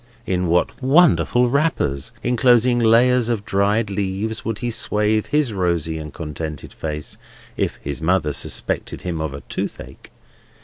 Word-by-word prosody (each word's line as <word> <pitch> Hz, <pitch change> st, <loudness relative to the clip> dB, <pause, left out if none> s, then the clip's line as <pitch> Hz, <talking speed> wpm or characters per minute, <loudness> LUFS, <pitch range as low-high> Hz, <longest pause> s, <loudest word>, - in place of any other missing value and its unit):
In 90 Hz, -1 st, 0 dB
what 85 Hz, +8 st, 0 dB
wonderful 135 Hz, -3 st, +4 dB
wrappers, 140 Hz, -, 0 dB
enclosing 120 Hz, 0 st, +3 dB
layers 120 Hz, +1 st, +4 dB
of 110 Hz, -4 st, -2 dB
dried 100 Hz, +3 st, +1 dB
leaves, 100 Hz, +3 st, -2 dB
would 115 Hz, -2 st, -3 dB
he 120 Hz, +1 st, -3 dB
swathe 110 Hz, -1 st, +1 dB
his 150 Hz, -6 st, +1 dB
rosy 85 Hz, -4 st, -1 dB
and 75 Hz, -1 st, -7 dB
contented 75 Hz, -1 st, -6 dB
face, 75 Hz, -1 st, -5 dB, 0.4 s
if -, -, -1 dB
his 70 Hz, 0 st, -4 dB
mother 80 Hz, -3 st, +1 dB
suspected -, -, -3 dB
him 85 Hz, -3 st, -3 dB
of 80 Hz, -2 st, -2 dB
a 70 Hz, -, -8 dB
toothache! -, -, -6 dB
100 Hz, 140 wpm, -21 LUFS, 80-120 Hz, 0.4 s, wonderful